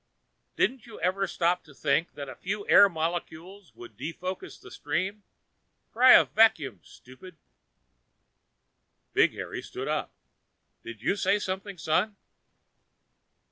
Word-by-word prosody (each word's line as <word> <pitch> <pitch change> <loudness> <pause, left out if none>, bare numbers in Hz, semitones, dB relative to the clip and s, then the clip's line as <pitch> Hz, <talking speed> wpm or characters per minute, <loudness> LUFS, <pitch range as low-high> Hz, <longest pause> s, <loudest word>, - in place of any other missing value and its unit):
"Didn't 255 -2 0
you 230 - -11
ever 185 +3 0
stop 175 +1 0
to 150 -4 -18
think 155 +4 0
that 140 -1 -7
a - - -7
few 200 +2 -5
air 200 0 +7
molecules 170 +3 -5
could 120 -3 -12
defocus 180 - -6
the - - -14
stream? 195 +4 -3 0.7
Try 255 +2 +7
a - - +8
vacuum, 155 - +2
stupid." 155 +8 -15 1.8
Big - - +4
Harry - - -6
stood - - -7
up. - - -2 0.7
"Did 115 -1 -10
you 195 - +1
say 205 0 +1
something, 195 0 -5
son?" 180 +7 0
180 Hz, 125 wpm, -27 LUFS, 155-200 Hz, 1.8 s, a